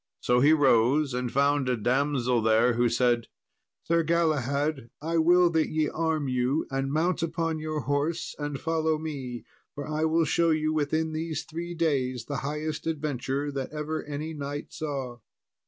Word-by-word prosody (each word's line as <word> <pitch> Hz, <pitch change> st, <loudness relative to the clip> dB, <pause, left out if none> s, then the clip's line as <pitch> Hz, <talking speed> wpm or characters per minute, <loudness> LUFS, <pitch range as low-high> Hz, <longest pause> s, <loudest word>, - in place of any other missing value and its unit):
So 125 Hz, 0 st, +2 dB
he 145 Hz, +4 st, +5 dB
rose, 135 Hz, -1 st, +4 dB
and 125 Hz, -1 st, -2 dB
found 140 Hz, -1 st, +2 dB
a 125 Hz, -, +1 dB
damsel 125 Hz, +1 st, +1 dB
there, 110 Hz, +2 st, +4 dB
who 120 Hz, +1 st, +2 dB
said, 120 Hz, -1 st, +1 dB, 0.6 s
"Sir 170 Hz, 0 st, +2 dB
Galahad, 150 Hz, -5 st, 0 dB
I 165 Hz, +2 st, 0 dB
will 175 Hz, +1 st, +5 dB
that 160 Hz, -1 st, +1 dB
ye 155 Hz, -1 st, 0 dB
arm 160 Hz, -3 st, -1 dB
you, 130 Hz, +4 st, 0 dB
and 135 Hz, 0 st, -1 dB
mount 165 Hz, +3 st, +1 dB
upon 165 Hz, -1 st, -1 dB
your 155 Hz, -1 st, -3 dB
horse 145 Hz, +4 st, -1 dB
and 145 Hz, -2 st, -3 dB
follow 160 Hz, -1 st, 0 dB
me, 135 Hz, -6 st, -5 dB, 0.3 s
for 145 Hz, -, -5 dB
I 155 Hz, +1 st, 0 dB
will 160 Hz, +1 st, +2 dB
show 170 Hz, +2 st, +2 dB
you 155 Hz, 0 st, +1 dB
within 155 Hz, +1 st, 0 dB
these 160 Hz, -1 st, -3 dB
three 170 Hz, +2 st, -6 dB
days 130 Hz, -7 st, 0 dB
the 145 Hz, -, -3 dB
highest 150 Hz, +3 st, -3 dB
adventure 145 Hz, -2 st, -2 dB
that 135 Hz, -2 st, -4 dB
ever 155 Hz, +1 st, -3 dB
any 150 Hz, +2 st, -5 dB
knight 145 Hz, 0 st, -6 dB
saw." 135 Hz, -5 st, -4 dB
150 Hz, 165 wpm, -27 LUFS, 130-160 Hz, 0.6 s, he